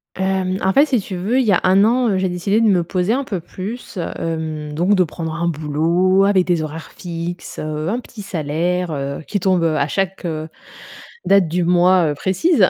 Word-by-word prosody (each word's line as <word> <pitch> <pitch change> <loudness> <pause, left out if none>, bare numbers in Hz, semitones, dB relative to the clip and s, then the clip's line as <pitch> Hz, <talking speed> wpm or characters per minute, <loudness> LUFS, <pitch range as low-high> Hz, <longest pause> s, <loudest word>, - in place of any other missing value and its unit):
Hem, 190 0 0
en 190 - +2
fait, 285 +3 +5
si 255 -5 +2
tu 190 -1 -6
veux, 210 +9 0
il 255 - +2
y 210 - +3
a 180 - +4
1 190 +2 +5
an, 245 +1 +2
heu, 190 - +1
j'ai 185 0 0
décidé 180 +5 0
de 230 - +3
me 180 -4 +3
poser 185 +5 0
un 275 +2 0
peu 195 -8 -4
plus, 200 +7 -8 0.2
hem, 155 -2 -4
donc 180 +6 +2
de 185 - +4
prendre 160 0 -5
un 170 0 -1
boulot 170 +5 +2
avec 195 -2 +3
des 170 -3 +1
horaires 155 +1 -7
fixes, 175 0 -6
heu, 155 +1 -3
un 235 +5 -1
petit 220 -4 -10
salaire, 175 +2 -1
heu, 140 0 -4
qui 205 - -1
tombe, 185 -1 +2
heu, 160 -1 +1
à 140 - +1
chaque, 195 +3 -2
heu, 155 -2 -3 0.8
date 195 -3 +4
du 175 +2 0
mois, 180 0 +4
heu, - - -1
précise 190 - +2
180 Hz, 215 wpm, -19 LUFS, 165-195 Hz, 0.8 s, fait